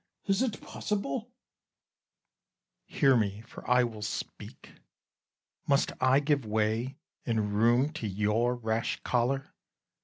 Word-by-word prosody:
Cas. 195 +2 +2
Is't 245 -5 -1
possible? 210 - -3 1.6
Bru. - - -12
Hear 135 -4 +5
me, 105 -2 0
for 115 - -11
I 125 0 +5
will 115 -3 -4
speak. 105 - -6 1.0
Must 140 -1 +3
I 130 +1 +5
give 145 -2 +1
way 110 +4 -1 0.3
and 110 -3 -1
room 120 +7 +3
to 110 - -3
your 105 +5 +1
rash 115 -1 -1
choler? 130 +3 0
120 Hz, 120 wpm, -29 LUFS, 110-140 Hz, 1.6 s, Hear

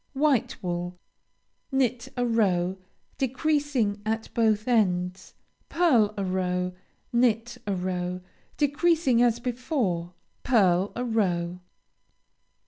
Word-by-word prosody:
White 275 -4 +2
wool 175 0 -3 0.7
Knit 255 -2 0
a 245 - +1
row, 190 -5 +1 0.4
decreasing 265 -5 0
at 220 +1 -3
both 220 -1 +2
ends. 185 -5 0 0.3
Pearl 245 -12 +3
a 200 - -1
row. 180 -1 -1 0.4
Knit 235 -1 +1
a 200 - 0
row, 180 0 -3 0.4
decreasing 295 -3 +2
as 240 -1 +3
before. 235 - -2 0.3
Pearl 195 -5 +3
a 245 - -2
row. 180 -6 0
220 Hz, 100 wpm, -26 LUFS, 180-250 Hz, 0.7 s, Pearl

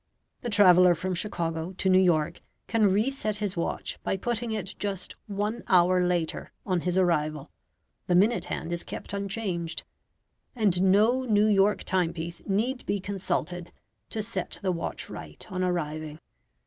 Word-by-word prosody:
The 240 - -3
traveller 180 -4 +6
from 185 +3 -3
Chicago 170 -2 -2
to 190 - -2
New 185 0 +6
York 160 -5 +2 0.2
can 220 -3 +3
reset 215 +1 0
his 205 -3 -2
watch 170 - -3
by 195 - -1
putting 235 +2 -2
it 210 -3 -3
just 195 -3 -3
one 210 +3 -2
hour 180 0 +5
later 175 -2 -1
on 185 -3 +1
his 180 +1 -1
arrival 155 -5 +1 0.6
the 180 - +3
minute 210 +6 +3
hand 165 - -4
is 170 - -2
kept - - -7
unchanged, 195 -4 -3 0.7
and 200 -6 +2
no 210 +7 +4
New 210 -3 +4
York 205 0 +3
timepiece 170 -2 -2
need 230 +6 0
be 200 - 0
consulted 180 -3 -3 0.4
to 215 - -2
set 200 -4 -3
the 190 - +2
watch 170 -2 -3
right 75 -1 -9
on 185 -1 -1
arriving. 155 -4 -2
185 Hz, 150 wpm, -27 LUFS, 175-210 Hz, 0.7 s, traveller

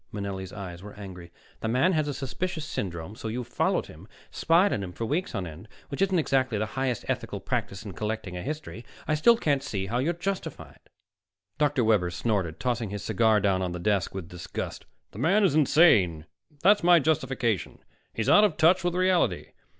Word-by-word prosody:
Manelli's 100 -2 -5
eyes 90 -4 -8
were 105 +1 -10
angry. 90 -4 -10 0.3
"The - - -3
man 130 +11 +3
has 155 -2 +1
a 145 - -2
suspicious 160 +5 -4
syndrome 90 - -5
so 110 - -6
you've 120 +2 -3
followed 120 - 0
him, 80 +4 -13
and - - -23
spied 175 +5 +3
on 100 - -1
him 90 -2 -6
for 115 - -4
weeks 160 - -2
on 95 -3 -2
end, 85 +6 -10 0.2
which 140 - -5
isn't 190 -1 +3
exactly 130 -7 +1
highest 125 +3 -2
ethical - - -3
practice 95 +2 -3
in 100 - -7
collecting 105 -2 -4
a 90 - -4
history. 145 - -6 0.2
I 155 - +1
still 230 +10 +5
can't 145 - +1
see 100 -8 -3
how 115 +5 -1
you're 155 +7 +1
justified." 190 +3 -5 0.8
Dr. 145 -4 +2
Webber 105 -5 +3
snorted, 90 -2 -2
tossing 120 -4 -1
his 100 0 -5
cigar 110 0 +3
down 95 -2 +1
on 90 -1 -2
the 90 - -5
desk 100 0 0
with 95 -4 -5
disgust. 90 0 -6 0.3
"The 105 - -10
man 190 - +3
is 190 - +3
insane. 125 - +4 0.4
That's 205 +2 +5
my 175 0 +7
justification. 135 - 0 0.3
He's 115 - -3
out 205 - +7
of 200 -7 +2
touch 175 +3 +4
with 175 0 0
reality. 180 - +1
115 Hz, 195 wpm, -27 LUFS, 95-155 Hz, 0.8 s, my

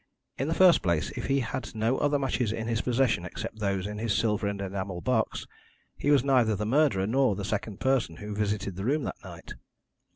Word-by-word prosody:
In 135 - 0
the 165 - 0
first 185 -2 +6
place, 85 -4 0
if - - -5
he 135 0 +2
had 120 0 -5
no 115 +4 +1
other 145 0 +2
matches 130 -5 -1
in 110 0 -3
his 115 -1 0
possession 125 -7 +1
except 90 +4 -6
those 100 -3 -1
in 105 0 -5
his 110 -1 0
silver 105 -2 +1
and 100 0 -3
enamel 95 -1 -4
box, 115 +1 -1 0.5
he 145 - -2
was 145 -4 +5
neither 125 -6 +3
the 105 +2 -3
murderer 115 -6 +2
nor 125 0 +2
the 100 - -4
second 105 -1 -3
person 130 -10 +1
who 105 +5 -7
visited 100 -2 -2
the 95 - -4
room 145 +4 +1
that - - -6
night. - - -10
110 Hz, 215 wpm, -28 LUFS, 100-130 Hz, 0.5 s, first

